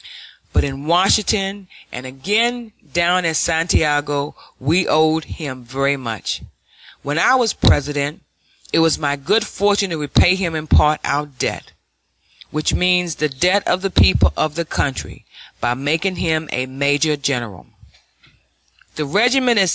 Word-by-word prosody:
Both - - +2
in 140 0 -5
Washington 195 +3 +1 0.2
and 125 +1 -8
again 220 - -1 0.2
down 175 +1 +2
at 165 -1 0
Santiago 150 -3 0 0.2
we 165 +7 +1
owed 155 0 +2
him 130 -6 -8
very 135 +3 -1
much. 115 -5 -5 0.6
When 145 +2 -3
I 255 - +4
was 240 -5 +2
President, 145 +1 +1 0.5
it - - +4
was 165 -1 +3
my 145 -2 0
good 205 +11 0
fortune 205 -2 0
to 165 - -2
repay 150 +4 +3
him 180 -4 -2
in 155 0 -4
part 150 0 +4
our 145 +1 -1
debt, 140 -4 -5 0.8
which 155 0 -1
means 180 -2 +1
the 155 - -1
debt 180 +9 +1
of 185 - +1
the 195 - -1
people 185 - +4
of 155 -1 -1
the 170 0 -2
country, 140 -3 -4 0.4
by 120 0 +1
making 160 +8 -1
him 160 -2 -1
a 125 - -1
major 140 +3 0
general. 120 - -4
155 Hz, 135 wpm, -19 LUFS, 140-180 Hz, 0.8 s, I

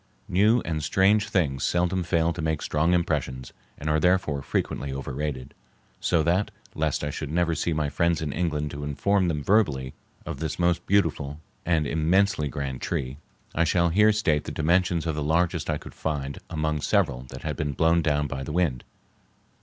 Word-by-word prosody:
New 105 +6 +4
and 80 -2 -2
strange 100 +6 +3
things 70 -10 0
seldom 90 +1 +1
fail 85 -1 +1
to 85 - -5
make 80 -1 -1
strong 75 +3 +1
impressions 70 -7 -2 0.2
and 75 - -6
are 75 0 +2
therefore 90 -4 +2
frequently 70 +1 -2
overrated; 70 0 -4 0.5
so 85 -3 +2
that, 90 +5 +1 0.2
lest 75 -2 -1
I 75 - -1
should 75 +1 -5
never 85 +1 +1
see 85 - -1
my 75 -2 0
friends 85 +3 +1
in 75 -3 -3
England 75 -3 -1
to 75 0 -6
inform 95 +7 +1
them 75 -4 -1
verbally 70 -11 +2 0.3
of - - -5
this 80 -1 -3
most 85 0 +1
beautiful 80 -7 +1 0.3
and 80 -3 +2
immensely 80 +2 +2
grand 65 -1 -4
tree, 65 +2 -3 0.3
I 85 - +2
shall 85 +1 +2
here 105 +5 +5
state 80 -9 +1
the - - -4
dimensions 85 +1 +1
of 80 - 0
the 75 - -3
largest 85 +1 +1
I 75 - +1
could - - -11
find 70 -3 -3
among 75 -1 -1
several 80 -12 +1
that - - -9
had - - -2
been 75 -2 -2
blown 80 +4 +3
down 75 -2 +1
by 70 -1 -4
the 65 - -5
wind. 75 -7 0
80 Hz, 185 wpm, -26 LUFS, 75-90 Hz, 0.5 s, here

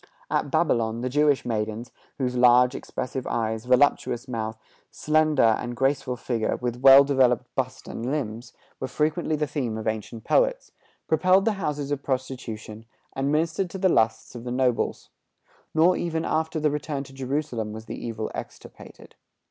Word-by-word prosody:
At - - 0
Babylon, 115 -7 +1
the 130 - -2
Jewish 145 +1 +2
maidens, 110 0 -3 0.3
whose 125 -2 -1
large, 125 +1 +5
expressive 130 0 -5
eyes, 110 0 -2
voluptuous 125 -1 +2
mouth, 110 -2 -4 0.3
slender 155 -2 +2
and 115 +2 +1
graceful 135 0 0
figure, 115 -2 -1
with 120 -1 -3
well 135 +1 +9
developed 130 -4 +2
bust - - -3
and 120 +2 -4
limbs, 120 -4 -4 0.3
were 130 - -3
frequently 155 +3 0
the 150 0 0
theme 135 -7 -3
of 110 - -5
ancient 110 +1 -4
poets, - - +1 0.4
peopled 185 +5 +3
the 225 - +3
houses 150 -7 -3
of 145 -1 -1
prostitution, 120 -5 -5 0.3
and 135 +1 -1
ministered 165 +4 0
to 190 - -6
the 190 0 +2
lusts 110 -7 +1
of 120 -2 -8
the 125 - -5
nobles. 125 -1 0 0.7
Nor 170 +3 +5
even 165 -1 -2
after 160 +1 -1
the 150 -1 +1
return 145 -1 -3
to 135 - -14
Jerusalem 130 -5 -3
was 110 +1 -8
the - - -7
evil 110 -2 -4
extirpated. - - -10
130 Hz, 160 wpm, -25 LUFS, 115-150 Hz, 0.7 s, well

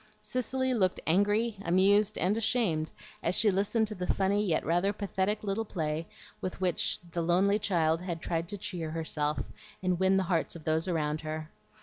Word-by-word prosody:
Cicely 260 +1 -1
looked 190 -6 +1
angry, 205 +6 +2
amused, 195 +4 +4
and 185 +5 +2
ashamed, 215 -9 0 0.3
as 175 - +1
she 210 -2 +4
listened 205 +4 +1
to - - -3
the 180 -3 -1
funny 200 +2 +1
yet 170 -6 0
rather 175 +4 +2
pathetic 200 +1 -1
little 205 +2 -1
play 160 -5 -3 0.3
with 185 - -4
which 185 -2 +1
the 170 - -1
lonely 190 +5 +3
child 165 -5 +1
had 175 -2 -4
tried 165 0 -2
to 205 - -5
cheer 175 -4 -4
herself 155 -2 -2 0.3
and 180 -2 +1
win 190 0 +4
the 190 - +2
hearts 170 -3 0
of 165 - -9
those 160 +3 0
about 155 -3 -1
her. 155 0 -5
185 Hz, 180 wpm, -30 LUFS, 165-205 Hz, 0.3 s, amused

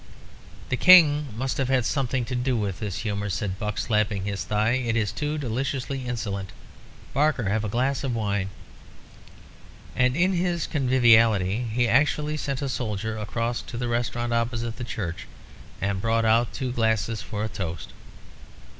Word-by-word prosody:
"The 125 - 0
King 150 -5 +7
must 130 +4 -2
have 135 - +1
had 130 -3 +2
something 130 -2 0
to 125 - -5
do 125 0 0
with 100 -4 -2
this 105 -3 -4
humour," 105 -1 -2
said 95 0 -3
Buck, 105 -1 -3
slapping 105 -3 0
his 100 -1 -3
thigh. 105 +1 +1
"It's 115 -5 0
too 150 0 -3
deliciously 130 0 -3
insolent. 100 -6 -3 0.6
Barker, 140 -8 +1
have 110 +1 0
a 105 - -2
glass 130 +6 0
of 130 -3 -1
wine." 100 -3 -1 1.5
And 125 0 +2
in 185 +4 +2
his 175 -2 0
conviviality 115 - +3
he 120 +2 +2
actually 150 +4 +2
sent 140 -2 -3
a - - -1
soldier 110 -3 -3
across 115 +2 -2
to 120 - -8
the 120 0 -2
restaurant 120 0 -1
opposite 115 0 -1
the 125 - -5
church 90 -8 -5 0.5
and 100 -1 -1
brought 115 +1 +1
out 115 +2 +3
two 130 -2 -3
glasses 110 -1 0
for 105 0 -4
a - - -1
toast. 85 -6 -6
115 Hz, 160 wpm, -25 LUFS, 105-130 Hz, 1.5 s, King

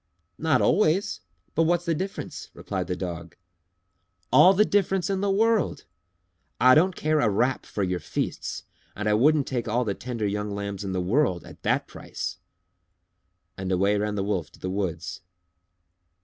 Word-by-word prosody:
"Not 155 -5 +2
always! 190 - +2 0.3
But 165 - +2
what's 175 +1 +1
the 170 - +1
difference?" 190 +5 -5
replied - - -4
the 90 - -2
Dog. 85 -2 -6 1.0
"All 175 +9 +8
the 210 +3 +5
difference 195 -2 +1
in 195 -1 -1
the 200 - +1
world! 220 -1 +1 0.7
I 130 0 +7
don't 175 +5 +4
care 155 0 +1
a 115 - +3
rap 120 +6 0
for 100 - -2
your 90 -1 -1
feasts - - -4 0.3
and 105 +1 -3
I 105 - +3
wouldn't 145 +6 +4
take 120 -3 -3
all 120 +3 +1
the 100 - 0
tender 120 -1 -4
young 105 +1 -2
lambs 100 -1 -4
in 95 - -3
the 95 - -1
world 95 - +1
at - - -13
that - - +1
price." - - -6 1.2
And 95 0 -3
away 100 +3 +2
ran 105 0 -1
the 100 - -1
Wolf 95 -6 -2
to - - -17
the 95 - -4
woods. 95 -2 -3
115 Hz, 170 wpm, -26 LUFS, 95-160 Hz, 1.2 s, All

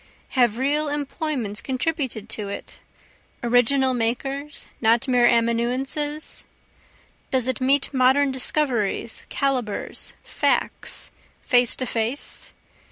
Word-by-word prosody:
Have 240 -4 +2
real 290 +4 +1
employments 285 -6 -3
contributed 260 -5 -2
to 210 -2 -3
it? 200 - -7 0.6
original 245 +2 +4
makers, 270 +5 -2 0.2
not 230 +2 +3
mere 245 -2 +5
amanuenses? 250 +6 0 0.9
Does 260 -2 +1
it 260 0 -1
meet 275 +2 +2
modern 265 +2 +4
discoveries, 250 -5 -1
calibres, 255 -7 -2
facts, - - 0 0.3
face 245 -2 +4
to 255 - -3
face? 230 +4 -3
255 Hz, 100 wpm, -24 LUFS, 235-280 Hz, 0.9 s, mere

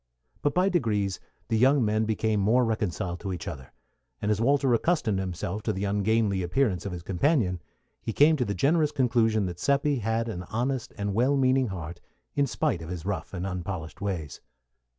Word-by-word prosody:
But 145 - 0
by 180 +2 +4
degrees 105 - 0 0.3
the 110 -2 +2
young 135 0 +4
men 110 +1 +1
became 110 -1 0
more 115 +5 +3
reconciled 90 -5 -2
to 95 0 -4
each 90 -3 -5
other; 65 -2 -7 0.5
and 105 - 0
as 105 +1 0
Walter 135 0 +3
accustomed 115 - +1
himself 95 +2 -3
to 110 - -1
the 95 +1 -3
ungainly 100 0 +1
appearance 95 0 0
of - - -4
his 90 -1 -6
companion, 95 - +1 0.4
he - - -3
came 150 +7 +5
to 125 - 0
the 100 - -2
generous 150 - +2
conclusion 115 -6 +2
that 90 -1 -5
Seppi 140 +2 +2
had 115 +1 -1
an 90 -6 -4
honest 125 +2 -2
and 100 -1 -2
well 130 +6 +2
meaning 130 -1 +3
heart 85 -3 -6 0.3
in 140 -1 +2
spite 125 - -1
of 80 - -8
his 90 -2 -5
rough 100 -1 -3
and 90 -1 -4
unpolished 90 -3 -5
ways. 90 -7 -4
110 Hz, 190 wpm, -27 LUFS, 95-130 Hz, 0.5 s, came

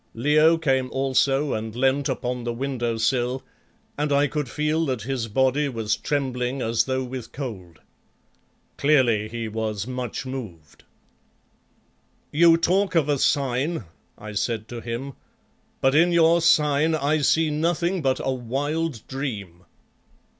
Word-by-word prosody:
Leo 155 +6 +4
came 135 -5 0
also 135 +2 +1
and 110 0 -4
leant 135 +2 +1
upon 125 -1 -3
the 120 - -2
window 120 -2 -2
sill, 125 +3 0 0.6
and 150 0 0
I 140 +1 +4
could 145 -2 -3
feel 155 +3 0
that 125 -5 -2
his 125 -2 -2
body 130 +5 +1
was 110 -4 -1
trembling 130 -2 -2
as 115 -2 +1
though 130 0 -1
with 125 -2 -7
cold. 100 - -7 1.0
Clearly 120 -8 +3
he 115 0 -4
was 110 -2 -3
much 125 0 -5
moved. 105 - -8 1.5
"You 165 +2 +6
talk 185 +2 +1
of 155 -3 +3
a 145 -2 +1
sign," 140 +4 0 0.3
I 105 0 -8
said 110 +1 -2
to 120 -1 -6
him, 120 +4 -5 0.7
"but 135 0 +3
in 170 +4 +4
your 170 0 +4
sign 155 -1 +3
I 155 +1 +1
see 160 +2 +2
nothing 170 +4 0
but 135 -2 +1
a 135 - 0
wild 140 +2 -3
dream." 105 -11 -5
135 Hz, 140 wpm, -24 LUFS, 115-150 Hz, 1.5 s, You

